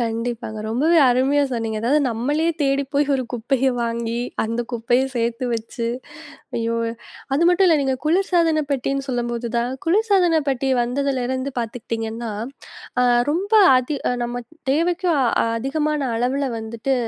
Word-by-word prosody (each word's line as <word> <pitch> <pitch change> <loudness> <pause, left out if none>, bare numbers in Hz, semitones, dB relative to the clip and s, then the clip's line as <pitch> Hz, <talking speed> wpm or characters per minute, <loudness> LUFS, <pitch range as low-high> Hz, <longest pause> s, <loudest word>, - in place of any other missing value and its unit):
கண்டிப்பாங்க, 230 -1 -3
ரொம்பவே 305 +9 +2
அருமையா 270 +4 +3
சொன்னீங்க! 225 -3 -2
அதாவது 285 +6 +3
நம்மளே 285 +8 0 0.2
தேடி 275 0 +2
போயி, 285 +1 +3
ஒரு 260 - 0
குப்பைய 255 +3 +1
வாங்கி, 235 0 -2 0.3
அந்த 230 +2 -2
குப்பைய 240 +2 +1
சேத்து 235 +2 -1
வச்சு, 230 +1 -3 0.7
ஐயோ! 230 0 -1 0.6
அது 330 +4 +3
மட்டும் 365 +2 +4
இல்ல 325 -3 +5
நீங்க 265 -1 +1
குளிர்சாதன 335 -2 +2
பெட்டின்னு 275 +1 -1
சொல்லும்போது 240 -1 -2
தான், 240 +1 0 0.2
குளிர்சாதன 370 -3 +3
பெட்டி 270 0 0
வந்ததிலிருந்து 260 +1 -1
பாத்துக்கிட்டீங்கன்னா, 225 0 -4 0.7
அ - - +4 0.3
ரொம்ப 390 +7 -2 0.2
அதி 255 +3 -1
அ - - +1
நம்ம 240 0 -4
அ - - -52 0.2
தேவைக்கும் 340 +1 +1 0.4
அதிகமான 300 +5 -1 0.2
அளவுல 260 +4 0
வந்துட்டு, 225 +4 -2
260 Hz, 135 wpm, -21 LUFS, 235-300 Hz, 0.7 s, இல்ல